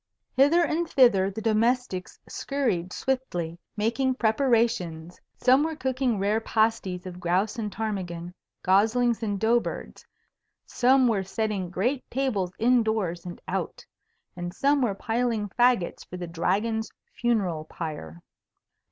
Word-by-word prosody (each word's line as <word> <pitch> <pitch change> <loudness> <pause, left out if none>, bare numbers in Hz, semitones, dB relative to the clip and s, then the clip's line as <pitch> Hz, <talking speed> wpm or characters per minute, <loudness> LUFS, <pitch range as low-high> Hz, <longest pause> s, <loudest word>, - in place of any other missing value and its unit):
Hither 290 +6 +5
and 335 +1 -1
thither 200 -8 +4
the 205 +2 -6
domestics 225 -3 0
scurried 230 -11 -2
swiftly, 175 -12 -2 0.2
making 235 +5 +1
preparations. 220 - 0 0.2
Some 260 +2 +4
were 320 0 -2
cooking 260 -4 0
rare 205 +3 +1
pasties 215 -5 0
of 180 -1 -7
grouse 185 +6 0
and 210 -2 -3
ptarmigan, 180 -5 -4 0.3
goslings 225 +5 +3
and 205 -3 -2
dough 230 +3 +4
birds; - - -7 0.6
some 260 +1 +3
were 215 -4 +1
setting 195 -1 -2
great 245 +9 -1
tables 230 -9 -1
in 245 +1 +4
doors 195 -6 -2
and 175 - -7
out; - - -3 0.5
and 175 0 -6
some 280 0 +2
were 220 -6 +1
piling 225 -1 -1
fagots 240 -4 +2
for 180 - -9
the 180 - -5
Dragon's 205 +7 -1 0.2
funeral 195 -10 0
pyre. 115 - -7
220 Hz, 130 wpm, -26 LUFS, 180-245 Hz, 0.6 s, Hither